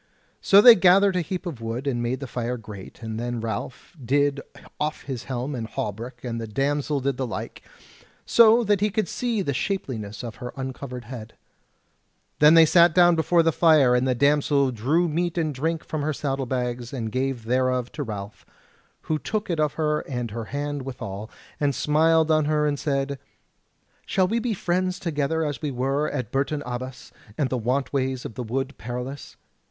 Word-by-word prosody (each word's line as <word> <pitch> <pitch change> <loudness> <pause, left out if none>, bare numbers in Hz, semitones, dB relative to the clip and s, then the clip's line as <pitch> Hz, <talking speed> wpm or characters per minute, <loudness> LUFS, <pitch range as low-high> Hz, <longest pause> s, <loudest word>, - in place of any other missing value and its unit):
So 200 +1 +7
they 240 +2 +11
gathered 190 0 +5
a 180 - +2
heap 180 +3 -5
of 150 -10 -6
wood 115 +4 -4
and 125 -4 -1
made 125 +3 -2
the - - -3
fire 125 0 -3
great; 105 -1 -11
and 110 0 -4
then 120 0 -3
Ralph 115 - -5
did 140 +3 +1 0.4
off 150 +1 -2
his 130 -4 -6
helm 130 +2 -3
and 115 -4 -4
hauberk 115 +4 -5
and 115 -2 -4
the 115 - -5
damsel 140 +4 -1
did 135 -1 -1
the 130 -1 -2
like, - - -6 0.6
so 230 +1 +6
that 205 -2 +1
he 210 - +3
could 210 -1 -1
see 230 +1 -1
the 140 - -1
shapeliness 120 - -3
of 115 -2 -7
her 125 -1 -7
uncovered 130 -1 -6
head. 120 -3 -9 1.0
Then 150 +2 +7
they 165 -1 +8
sat 170 0 +5
down 175 -1 +6
before 165 +1 +3
the 165 - +3
fire, 155 -6 +5
and 125 +1 +2
the 130 - +1
damsel 140 0 +3
drew 140 +10 +1
meat 170 +2 -1
and 155 -3 0
drink 160 +4 -2
from 155 - -4
her 155 +1 -1
saddle 135 -2 -2
bags, 125 -1 -3
and 115 -5 -4
gave 130 -1 -2
thereof 125 0 0
to 150 - -6
Ralph, 105 -5 -6 0.6
who 155 -1 -2
took 210 +1 -3
it 165 - -1
of 150 -2 +1
her 150 -1 0
and 120 -4 -3
her 115 +1 -5
hand 145 +2 -3
withal, 110 -5 -6 0.3
and 145 -2 +1
smiled 160 +1 +3
on 155 -1 +3
her 150 0 +1
and 145 -2 0
said: 140 -1 -1 0.9
"Shall 185 -1 +2
we 225 +5 0
be 230 -2 -1
friends 185 0 -1
together 160 -1 -1
as 145 -2 -4
we 150 - -2
were 135 +3 -1
at 130 -7 -4
Bourton 140 +2 -1
Abbas 125 +1 -6 0.3
and 140 -4 0
the 130 - 0
want 130 +5 -1
ways 130 -2 -1
of - - -6
the 125 - -5
Wood 135 +4 -3
Perilous?" 125 +4 -6
140 Hz, 190 wpm, -24 LUFS, 125-160 Hz, 1.0 s, they